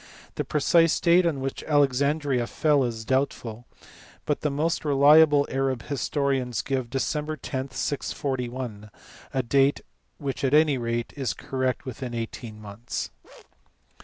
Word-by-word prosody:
The - - -2
precise 165 +2 +3
date 175 +1 +4
on 145 -5 -1
which 135 0 -4
Alexandria 140 -2 +2
fell 150 -3 +2
is 115 -3 -3
doubtful 120 -3 -2 0.6
but 150 - -1
the 150 - +1
most 155 +4 -1
reliable 145 0 +6
Arab 135 -2 -1
historians 135 -3 -1
give 130 -3 -2
Dec. 150 +4 -2
10, 130 +1 -3
641 125 -6 -3 0.4
a 130 - 0
date 135 +3 +2 0.4
which 140 -1 -4
at 135 +2 +3
any 150 -4 +4
rate 115 0 -2
is 135 -4 -2
correct 130 0 -2
within 125 -1 -6
eighteen 115 -1 -6
months. 105 +3 -6
135 Hz, 130 wpm, -26 LUFS, 125-145 Hz, 0.6 s, reliable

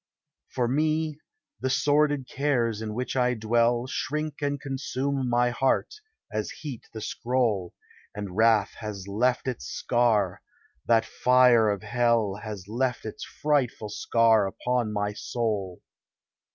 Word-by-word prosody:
For 125 -2 0
me, 155 +3 0 0.4
the 130 - -1
sordid 145 -1 +2
cares 120 -6 0
in 110 -1 -4
which 125 +2 -3
I 125 -1 +2
dwell, 120 +2 +2
Shrink 150 +3 -3
and 145 0 -1
consume 135 -1 -2
my 120 0 +2
heart, 130 +2 +1 0.4
as - - -2
heat 140 -7 -8
the 110 - -7
scroll; 115 -6 -1 0.4
And 100 -3 -6
wrath 110 -2 +4
has 105 -3 -6
left 120 +6 0
its 125 - -3
scar 105 -1 +1 0.2
— 65 +2 -37
that 115 -1 +4
fire 125 -3 +4
of 100 -2 -2
hell 115 -4 +1
Has 105 -4 -7
left 125 +2 -1
its 110 +6 -6
frightful 140 -7 -1
scar 110 -1 +3
upon 120 +2 -1
my 105 0 -1
soul. 105 -5 -3
120 Hz, 135 wpm, -26 LUFS, 105-130 Hz, 0.4 s, wrath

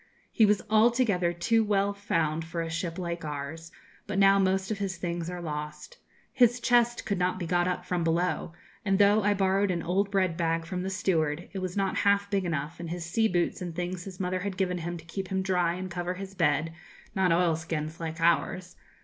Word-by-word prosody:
He 220 - +5
was 210 0 +2
altogether 215 -5 +3
too 225 +7 +2
well 200 -1 +1
found 165 -6 -1
for 165 +1 -4
a 165 - -5
ship 170 0 -3
like 170 -2 -4
ours, 155 +3 -6 0.4
but 205 -1 -3
now 195 0 +6
most 190 +1 +1
of 210 - -2
his 190 -3 -2
things 170 -1 -3
are 180 -1 -6
lost. 150 - -6 0.3
His 245 -2 +4
chest 240 -1 +2
could 200 -3 -1
not 180 +1 +1
be 180 - -4
got 175 +1 +1
up 180 0 -2
from 180 -2 -1
below, 170 +1 0 0.3
and 195 -1 +2
though 205 +1 +5
I 205 0 +2
borrowed 195 +1 +2
an 175 -2 -1
old 195 +3 +1
bread 190 -4 +1
bag 165 -1 0
from 180 +1 -4
the 190 - -3
steward, 165 -5 0
it 195 - -3
was 185 0 -4
not 195 -1 0
half 200 0 +2
big 195 -2 +1
enough, 155 -1 -3
and 170 -1 -5
his 170 0 -4
sea 220 +7 +2
boots 175 -2 0
and 175 -2 -5
things 180 0 -4
his 190 -2 -9
mother 185 0 -1
had 190 0 -4
given 180 -2 0
him 170 +1 -4
to 165 - -13
keep 190 +3 -5
him 190 0 -1
dry 180 -3 +1
and 185 0 -6
cover 175 +1 -3
his 195 +1 -7
bed 155 -2 +1 0.4
not 190 -3 +2
oilskins, 165 -2 0
like 160 0 -5
ours.' 175 +2 +1
180 Hz, 215 wpm, -28 LUFS, 170-195 Hz, 0.4 s, now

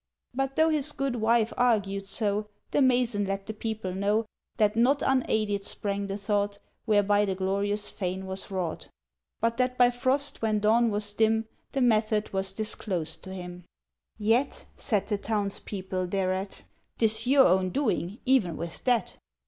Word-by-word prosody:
—But, 270 +1 -2
though 320 +1 +4
his 300 -1 +1
good 270 -3 -2
wife 230 0 +2
argued 200 -5 +1
so, 210 0 -1 0.2
The - - +2
mason 245 -5 +2
let 195 0 -3
the 220 - -5
people 220 -4 -4
know 205 +4 +1 0.3
That 210 -2 +3
not 255 +5 +3
unaided 215 -6 +1
sprang 200 0 -3
the 195 0 -3
thought 205 0 -1 0.3
Whereby 205 -1 +3
the 190 -1 -1
glorious 200 +2 -1
fane 190 0 -3
was 190 +1 -3
wrought, 180 -4 -3 0.5
But 230 0 +1
that 250 0 0
by 245 0 +5
frost 260 +4 0
when 220 -1 +1
dawn 225 +3 +3
was 205 -1 +1
dim 220 +1 +2 0.3
The 270 - 0
method 215 -3 +2
was 190 0 -1
disclosed 190 -6 -3
to - - -8
him. 180 -1 -8 0.5
"Yet," 225 +6 +1
said 210 -4 0
the 205 -2 -1
townspeople 200 -3 -2
thereat, 190 +1 -2 0.3
"'Tis 220 +1 +2
your 270 +1 +6
own 185 +1 +3
doing, 205 -6 -1
even 245 -11 +2
with 170 -1 -5
that!" 245 -6 +1
210 Hz, 155 wpm, -27 LUFS, 195-235 Hz, 0.5 s, your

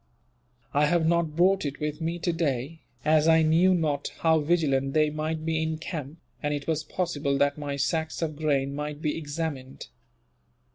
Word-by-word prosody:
I 150 +1 +4
have 170 +1 +2
not 165 -2 +1
brought 190 +3 +3
it 140 -2 -4
with 150 +1 -3
me, 165 +2 -1
today, 160 -4 -2 0.2
as 155 0 +4
I 160 0 +6
knew 170 +4 +4
not 150 -4 0
how 160 -1 +4
vigilant 145 -4 +1
they 155 -1 +3
might 155 +1 -3
be 160 -1 0
in 160 0 -1
camp, 155 -2 -6 0.2
and 150 -1 0
it 140 -1 -5
was 155 -1 -1
possible 150 -4 -1
that 140 +1 +1
my 145 -1 -3
sacks 160 +3 -1
of 155 -2 -2
grain 140 -3 0
might 150 0 -4
be 150 -1 -1
examined. 145 -4 -5
155 Hz, 175 wpm, -27 LUFS, 145-165 Hz, 0.2 s, I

